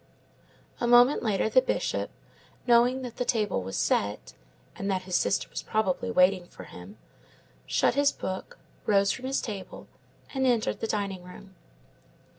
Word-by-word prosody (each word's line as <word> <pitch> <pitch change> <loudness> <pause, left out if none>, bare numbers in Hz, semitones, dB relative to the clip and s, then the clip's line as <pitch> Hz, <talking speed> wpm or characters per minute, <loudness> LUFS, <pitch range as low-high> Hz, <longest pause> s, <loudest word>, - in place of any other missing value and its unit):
A 240 - 0
moment 245 +3 +6
later, 215 -2 +1
the 240 +4 +5
Bishop, - - -2 0.6
knowing 245 +2 +4
that 245 -2 -7
the - - 0
table 210 - 0
was 95 +1 -5
set, 100 0 -1 0.4
and 195 - -4
that 190 -1 -1
his 185 -1 -3
sister 195 - +1
was - - -4
probably 215 +1 -1
waiting 185 -3 +3
for - - -12
him, 90 +4 -12 0.7
shut - - +2
his 285 +1 +3
book, 190 0 -6 0.3
rose 200 -1 +4
from 260 - -5
his 270 +1 0
table, 205 -5 -7 0.5
and 265 -1 +1
entered 235 -3 +1
the 225 - -2
dining 200 -4 -2
room. 185 +2 -13
210 Hz, 155 wpm, -27 LUFS, 185-245 Hz, 0.7 s, moment